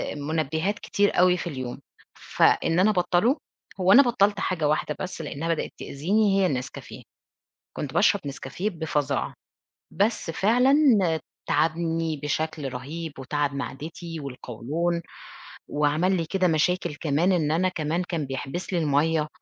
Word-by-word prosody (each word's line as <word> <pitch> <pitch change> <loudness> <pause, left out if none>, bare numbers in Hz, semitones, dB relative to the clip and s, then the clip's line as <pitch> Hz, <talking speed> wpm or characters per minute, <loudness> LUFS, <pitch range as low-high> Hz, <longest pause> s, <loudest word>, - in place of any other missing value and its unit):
مُنبِّهات 160 +6 -1
كتير 205 -2 +1
أوي 180 0 +5
في 175 - -5
اليوم، 130 -6 -5 0.4
فإن 165 +2 +2
أنا 205 +3 +5
أبطّله 180 - +2 0.4
هو 185 +1 +4
أنا 275 +7 +9
بطّلت 210 -4 +2
حاجة 165 -5 0
واحدة 150 0 0
بس 185 -3 -5
لأنها 155 +2 -4
بدأت - - -4
تؤذيني 195 +7 +1
هي 190 - +4
النسكافيه، 130 -6 -4 0.7
كنت - - -4
باشرب - - +4
نسكافيه 140 +9 -4
بفَظاعة 150 -4 -2 0.6
بس 205 -4 0
فعلًا 245 - +3 0.7
تعبني 165 -1 0
بشكل 150 -2 -2
رهيب 155 +5 -6
وتعب 145 +2 -1
معدتي 160 +4 -6
والقوْلون 140 +6 -3 0.7
وعمل 150 +6 +1
لي 165 - -1
كده 185 +2 +1
مشاكل 170 0 +1
كمان 160 +5 +1
إن 155 -4 +1
أنا 185 +3 +2
كمان 165 0 -2
كان 170 -4 -3
بيحبس 135 +8 -5
لي 175 - +2
المَيَّة، 155 +1 +2
165 Hz, 135 wpm, -25 LUFS, 150-185 Hz, 0.7 s, أنا